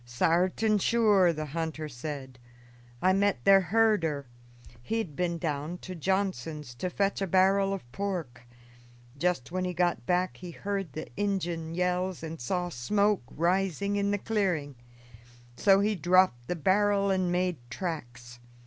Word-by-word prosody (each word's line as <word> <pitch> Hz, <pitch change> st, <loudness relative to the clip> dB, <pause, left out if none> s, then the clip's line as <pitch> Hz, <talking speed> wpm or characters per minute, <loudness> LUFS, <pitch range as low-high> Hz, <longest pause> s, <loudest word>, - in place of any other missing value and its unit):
"Sartin 180 Hz, -, +1 dB
sure," 205 Hz, -5 st, +4 dB
the 155 Hz, -1 st, -4 dB
hunter 160 Hz, +1 st, -4 dB
said. 130 Hz, -2 st, -7 dB, 0.6 s
"I 185 Hz, +1 st, +5 dB
met 195 Hz, -10 st, +1 dB
their 195 Hz, 0 st, +7 dB
herder; 180 Hz, -7 st, +2 dB, 0.6 s
he 225 Hz, -, -2 dB
had 180 Hz, -11 st, -3 dB
been 175 Hz, 0 st, -1 dB
down 155 Hz, +1 st, -3 dB
to 185 Hz, -, -6 dB
Johnson's 165 Hz, -6 st, -2 dB
to 180 Hz, +10 st, -3 dB
fetch 200 Hz, +2 st, -1 dB
a 195 Hz, -, 0 dB
barrel 195 Hz, +2 st, +3 dB
of 195 Hz, -, -3 dB
pork. 170 Hz, -10 st, -4 dB, 0.7 s
Just 170 Hz, -2 st, -1 dB
when 185 Hz, +1 st, -1 dB
he 180 Hz, -1 st, -3 dB
got 175 Hz, -9 st, 0 dB
back 180 Hz, +1 st, +1 dB
he 180 Hz, -, -8 dB
heard 195 Hz, -2 st, -4 dB
the 155 Hz, -, -5 dB
Injun 175 Hz, -5 st, -2 dB
yells 180 Hz, 0 st, -1 dB
and 160 Hz, -2 st, -6 dB
saw 175 Hz, +8 st, -1 dB
smoke 200 Hz, +9 st, +1 dB
rising 190 Hz, +3 st, 0 dB
in 200 Hz, 0 st, +1 dB
the 205 Hz, -, +1 dB
clearing, 190 Hz, -10 st, -1 dB, 0.8 s
so 195 Hz, +7 st, +4 dB
he 210 Hz, +1 st, +2 dB
dropped 175 Hz, -8 st, +3 dB
the 180 Hz, -, -1 dB
barrel 200 Hz, +4 st, +2 dB
and 185 Hz, -2 st, +1 dB
made 180 Hz, -1 st, 0 dB
tracks. 120 Hz, -6 st, -6 dB
180 Hz, 150 wpm, -29 LUFS, 155-195 Hz, 0.8 s, their